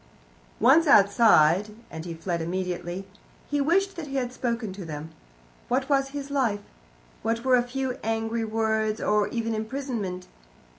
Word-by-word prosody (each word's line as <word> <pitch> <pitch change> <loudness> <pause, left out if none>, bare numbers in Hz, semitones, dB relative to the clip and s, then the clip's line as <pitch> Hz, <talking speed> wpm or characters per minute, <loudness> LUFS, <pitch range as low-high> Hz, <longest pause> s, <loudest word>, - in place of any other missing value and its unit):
Once 285 +8 +5
outside 200 - +5 0.2
and 160 +1 -7
he 170 - -5
fled 170 +1 -3
immediately 180 +1 -3 0.4
he 290 0 0
wished 385 +7 +2
that 330 -4 -6
he 275 - -6
had 250 -2 -1
spoken 235 -5 -2
to 195 0 -8
them. 155 -1 -7 0.6
What 260 +3 0
was 275 -1 +3
his 280 0 -6
life? 235 -8 +1 0.6
What 230 +2 -1
were 260 -1 +5
a 245 - +4
few 255 +1 -3
angry 225 +1 -1
words, 220 0 0
or 210 -1 +2
even 230 -1 -2
imprisonment? 220 -5 -4
225 Hz, 150 wpm, -26 LUFS, 195-265 Hz, 0.6 s, Once